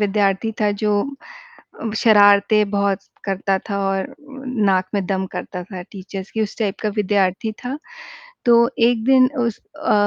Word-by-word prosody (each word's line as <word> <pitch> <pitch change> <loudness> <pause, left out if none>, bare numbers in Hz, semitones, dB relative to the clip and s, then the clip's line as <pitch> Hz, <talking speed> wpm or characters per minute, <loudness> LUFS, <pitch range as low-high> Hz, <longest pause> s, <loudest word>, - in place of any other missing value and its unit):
विद्यार्थी 205 +1 +1
था 210 -1 +3
जो 210 - +2 0.9
अम, 225 - -3
शरारतें 205 -1 +5
बहुत 200 -1 +1 0.3
करता 195 0 0
था 200 - -1
और 195 0 -2 0.5
नाक 185 -1 +2
में 200 -2 0
दम 190 0 -1
करता 180 - -5
था 185 -2 -8
टीचर्स 195 0 -7
की 220 - -2
उस 210 - -4
टाइप 205 -4 -1
का 215 - +1
विद्यार्थी 200 +1 +1
था। 265 +4 -3 0.7
तो 240 - +7 0.3
एक 235 -2 0
दिन 260 0 +5
उस 235 -3 -1 0.3
अ, - - +4
205 Hz, 155 wpm, -20 LUFS, 195-220 Hz, 0.9 s, तो